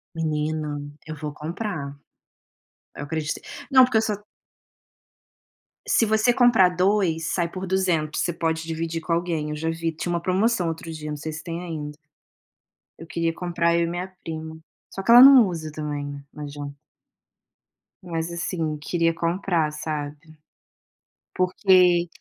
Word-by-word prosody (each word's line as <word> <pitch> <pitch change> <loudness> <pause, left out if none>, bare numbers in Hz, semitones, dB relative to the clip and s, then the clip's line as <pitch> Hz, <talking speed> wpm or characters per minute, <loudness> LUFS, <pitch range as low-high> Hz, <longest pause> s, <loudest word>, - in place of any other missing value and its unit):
Menina, 155 -1 -2 0.3
eu 155 - -5
vou 150 -1 -6
comprar. 155 -2 -5 1.0
Eu - - -6
acredito 155 0 -3 0.3
não, 260 -1 +8
porque 250 -3 +2
eu - - +4
só 215 -1 -1 1.7
Se 230 - +3
você 220 +2 +3
comprar 240 -7 +5
2, 180 -3 +1
sai 170 -2 0
por 185 +2 -6
200, 180 -5 0
você 175 - 0
pode 160 -1 -1
dividir 165 0 -3
com 165 - -2
alguém. 165 -3 -1
Eu 150 - -3
já 160 +2 -3
vi, 165 0 -2
tinha 175 +2 -3
uma 170 - -1
promoção 190 +2 +1
outro 165 0 -5
dia, 155 -1 -6
não 150 - -4
sei 155 +2 -5
se 155 +1 -7
tem 170 0 -5
ainda. 150 -4 -6 1.0
Eu 165 - -10
queria 165 -1 -1
comprar, 170 -1 0
eu 170 - +2
e 170 - +1
minha 175 +2 -3 0.2
prima, 160 0 -6 0.3
só 195 - -6
que 230 - +3
ela 240 +1 +11
não 265 -4 +9
usa 160 -4 -5
também, 145 -2 -5
não 150 - -8
adianta. 145 -1 -7 1.3
Mas, 165 -1 -3
assim, 165 -2 -2
queria 165 +2 0
comprar, 170 -1 0
sabe, 150 -1 -4 1.2
porque 180 -1 +4
165 Hz, 150 wpm, -24 LUFS, 155-180 Hz, 1.7 s, ela